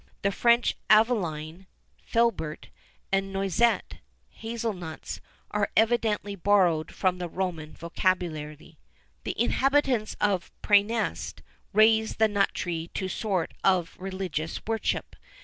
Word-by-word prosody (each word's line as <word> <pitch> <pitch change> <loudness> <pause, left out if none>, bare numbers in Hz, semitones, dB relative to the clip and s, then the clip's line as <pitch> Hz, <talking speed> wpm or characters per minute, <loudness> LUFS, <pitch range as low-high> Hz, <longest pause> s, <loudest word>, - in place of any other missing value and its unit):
The 200 - +2
French 235 +3 +3
Aveline 185 -6 +2 0.3
(filbert), 230 -10 0 0.4
and 195 0 +1
Noisette 195 +4 +1 0.3
(hazel 225 0 -4
nuts), 170 -4 -7 0.3
are 210 -1 0
evidently 220 -2 +2
borrowed 175 -5 +2
from 185 -2 0
the 175 -1 -4
Roman 170 -4 -3
vocabulary. 165 -4 -2 0.5
The - - -4
inhabitants 265 -2 +2
of 195 -4 0
Præneste 210 +2 +1 0.3
raised 220 +1 +4
the 220 - +5
nut 205 -2 +2
tree 165 -2 -3
to 190 - -2
a - - -3
sort 190 -5 -1
of 185 -3 +2
religious 185 -4 -3
worship. 225 0 -2
195 Hz, 115 wpm, -27 LUFS, 175-220 Hz, 0.5 s, the